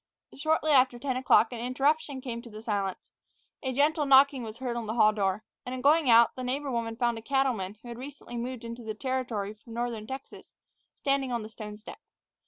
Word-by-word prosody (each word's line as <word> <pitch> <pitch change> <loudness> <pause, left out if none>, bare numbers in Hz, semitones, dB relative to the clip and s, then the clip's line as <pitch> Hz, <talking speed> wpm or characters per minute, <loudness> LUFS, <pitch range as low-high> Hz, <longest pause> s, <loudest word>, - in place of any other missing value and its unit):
Shortly 310 +1 +1
after 255 -3 +5
ten 260 +1 -2
o'clock 255 -2 +4
an 235 - -5
interruption 275 +3 0
came 235 -2 -5
to 235 - -12
the 215 0 -10
silence. 200 -4 -3 0.5
A 260 - -2
gentle 295 +3 +2
knocking 275 0 +6
was 220 -1 -7
heard 250 -2 -3
at 235 - -2
the 220 - -2
hall 215 -2 +5
door, 200 0 0 0.2
and, 250 - -5
on 255 - -5
going 295 +1 +4
out, 230 0 +6
the 255 - -5
neighbor 270 +3 -2
woman 230 -2 -2
found 235 -1 0
a - - -12
cattleman 235 -6 0
who - - -11
had 235 0 -7
recently 265 -2 -9
moved 245 0 -4
into 235 +1 -7
the 220 -1 -5
Territory 240 -5 -2
from 225 +2 -13
northern 235 -3 -3
Texas 265 +2 -9 0.4
standing 275 -2 0
on 235 -2 -1
the 215 - -8
stone 210 -2 -8
step. 220 - -11
245 Hz, 210 wpm, -28 LUFS, 225-270 Hz, 0.5 s, knocking